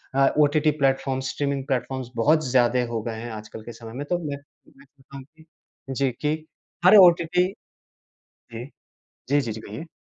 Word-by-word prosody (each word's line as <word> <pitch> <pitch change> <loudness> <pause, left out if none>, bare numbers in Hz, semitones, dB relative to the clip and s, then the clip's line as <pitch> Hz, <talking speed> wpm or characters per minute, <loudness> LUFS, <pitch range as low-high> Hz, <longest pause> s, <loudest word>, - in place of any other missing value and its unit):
अ, 135 0 +5
OTT 150 +1 +3
platforms, 135 -1 0
streaming 140 -2 -2
platforms 130 -1 -2
बहुत 155 +7 +3
ज़्यादा 125 0 +3
हो 115 -1 -2
गए 115 -1 -4
हैं 120 +1 -6
आजकल 110 0 -9
के 120 - -8
समय 115 0 -11
में, 140 +4 -5
तो 175 - +1
मैं 140 - -4 0.4
मैं 140 - -18
कहता 140 0 -15
हूँ 135 - -9
कि 160 - -18 0.4
जी, 135 0 0
कि 150 +5 -1 0.5
हर 185 +4 +8
ओटीटी 180 -1 +5 1.1
जी। 115 +2 -6 0.6
जी, 145 +2 +3
जी, 120 -5 -3
जी, 110 - -8
कहिए। 110 +11 -8
135 Hz, 175 wpm, -24 LUFS, 120-150 Hz, 1.1 s, हर